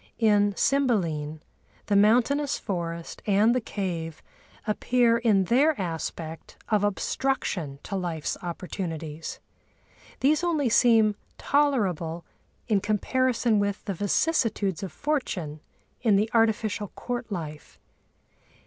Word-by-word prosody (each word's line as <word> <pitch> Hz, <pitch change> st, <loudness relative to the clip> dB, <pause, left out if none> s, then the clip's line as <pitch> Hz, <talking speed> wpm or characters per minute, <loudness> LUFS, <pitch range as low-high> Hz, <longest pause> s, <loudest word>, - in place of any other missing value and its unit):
In 205 Hz, -3 st, +3 dB
Cymbeline 170 Hz, -, 0 dB, 0.4 s
the 205 Hz, -, +1 dB
mountainous 245 Hz, +8 st, +3 dB
forest 170 Hz, -4 st, -5 dB
and 210 Hz, +3 st, +4 dB
the 255 Hz, -, +1 dB
cave 170 Hz, -7 st, -4 dB, 0.4 s
appear 235 Hz, +2 st, +2 dB
in 215 Hz, -5 st, +3 dB
their 275 Hz, -, +3 dB
aspect 165 Hz, -2 st, -5 dB
of 210 Hz, -2 st, +2 dB
obstruction 205 Hz, -, -1 dB
to 195 Hz, -, -5 dB
life's 170 Hz, -5 st, -2 dB
opportunities. 165 Hz, -3 st, -5 dB, 0.8 s
These 300 Hz, +5 st, +3 dB
only 310 Hz, -7 st, +1 dB
seem 225 Hz, -2 st, +5 dB, 0.2 s
tolerable 190 Hz, -, 0 dB, 0.4 s
in 210 Hz, -4 st, +2 dB
comparison 230 Hz, +2 st, +1 dB
with 200 Hz, 0 st, -2 dB
the 200 Hz, -, -2 dB
vicissitudes 205 Hz, -, 0 dB
of 195 Hz, -, -5 dB
fortune 190 Hz, -, -2 dB, 0.4 s
in 220 Hz, -4 st, +4 dB
the 215 Hz, +3 st, +1 dB
artificial 220 Hz, -2 st, +1 dB
court 245 Hz, -2 st, -4 dB
life. 155 Hz, -5 st, -6 dB
205 Hz, 105 wpm, -26 LUFS, 175-240 Hz, 0.8 s, seem